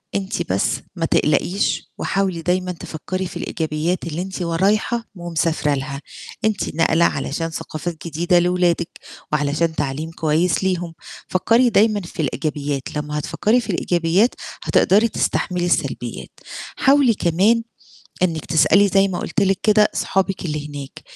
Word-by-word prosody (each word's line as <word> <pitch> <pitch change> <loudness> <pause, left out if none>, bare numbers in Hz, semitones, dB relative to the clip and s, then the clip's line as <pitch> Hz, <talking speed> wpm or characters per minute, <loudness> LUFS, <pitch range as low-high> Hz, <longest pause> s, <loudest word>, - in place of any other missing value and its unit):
أنتِ 195 - -2
بس 95 - 0
ما - - -1
تقلقيش 195 +3 +1
وحاولي 190 -4 -1
دايمًا 180 +2 0
تفكّري 180 +2 -5
في 175 - -7
الإيجابيّات 160 +1 -2
اللي 165 +1 -3
أنتِ 190 -1 -5
و 170 -1 -1
رايحة 215 +6 +1
ومسافرة 165 -3 0
لها، 140 +1 -4 0.4
أنتِ 210 -7 -1
ناقلة 165 +1 +3
علشان 165 -1 -1
ثقافات 160 +1 -6
جديدة 175 +3 +2
لأولادِك 175 -1 +1 0.4
وعلشان 150 +2 0
تعليم 150 +3 -3
كويس 165 +3 +1
ليهم، 175 -3 -1 0.3
فكّري 230 +6 +3
دايمًا 210 -1 +3
في 170 - -6
الإيجابيات، 145 -2 -3
لمّا 150 0 -3
هتفكّري 220 +10 +1
في 220 - -10
الإيجابيات 175 +6 +2 0.3
هتقدري 210 +5 +4
تستحملي 180 -4 -1
السلبيّات. 175 - -2 0.4
حاولي 275 -4 +4
كمان 200 +7 +2 0.6
إنِّك 165 -4 0
تسألي 200 +5 +4
زي 195 +1 +3
ما 180 - -3
قُلت 215 - -2
لِك 195 -2 +2
كده 210 -1 +5
أصحابِك 195 -1 -1
اللي 150 -2 -3
هناك، 140 -2 -8
175 Hz, 135 wpm, -21 LUFS, 155-195 Hz, 0.6 s, كده